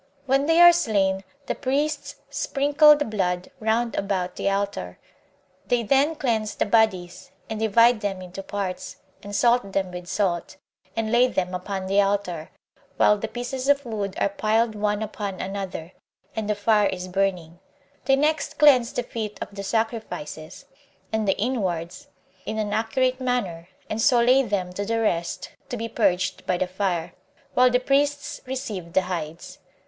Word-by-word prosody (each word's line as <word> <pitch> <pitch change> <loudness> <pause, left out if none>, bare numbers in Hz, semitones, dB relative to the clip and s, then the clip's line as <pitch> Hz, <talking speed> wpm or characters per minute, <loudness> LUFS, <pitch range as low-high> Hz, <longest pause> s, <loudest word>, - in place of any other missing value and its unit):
When 275 +2 +2
they 325 +1 +4
are 345 0 +10
slain, 195 - +1 0.2
the - - -1
priests 285 +3 -2 0.2
sprinkle 290 +2 +4
the 295 - -1
blood 185 -1 -2
round 225 +1 0
about 185 -2 -2
the - - 0
altar; 195 - -2 0.7
they 240 -1 +1
then 275 +7 +3
cleanse 220 -7 -1
the - - 0
bodies, 200 -5 +1 0.2
and 220 - -3
divide 230 +1 +4
them 200 -2 -2
into 185 +1 -8
parts, 195 -2 -4 0.3
and 205 0 -7
salt 235 -3 +2
them 190 -2 0
with 180 0 -8
salt, 185 -2 -1 0.4
and 225 -1 -1
lay 245 +2 +5
them 185 -6 -2
upon 190 +1 -4
the 195 +2 +3
altar, 195 -5 -1 0.5
while 210 - +5
the 210 +2 -4
pieces 255 +3 -4
of 285 -1 +3
wood 205 -4 -3
are - - +2
piled 220 +3 +1
one 210 0 -1
upon 205 -3 -5
another, 190 -3 -5 0.4
and 220 -2 -3
the 210 - +2
fire 210 0 +3
is 185 0 -4
burning; 180 -3 -1 0.5
they 270 +1 +5
next 305 +3 0
cleanse 265 -5 +6
the 245 - -2
feet 215 -3 -5
of - - -7
the 200 - -6
sacrifices, 200 -8 -4 0.5
and 220 -1 0
the 195 - +2
inwards, 190 -8 -2 0.4
in 220 - -3
an 210 -1 -1
accurate 255 +4 0
manner 200 -10 -2 0.2
and 215 +1 -2
so 245 +2 +5
lay 250 +3 +5
them 195 -7 -2
to 200 - -3
the 225 +2 -1
rest 170 -6 -1 0.2
to 245 - -3
be 230 0 -3
purged 190 -5 0
by 180 - +1
the 185 - 0
fire, 180 -3 -2 0.4
while 250 0 +5
the 250 0 +2
priests 285 +2 0
receive 210 -10 -5
the 190 - +3
hides. 165 -3 -6
210 Hz, 165 wpm, -24 LUFS, 185-245 Hz, 0.7 s, are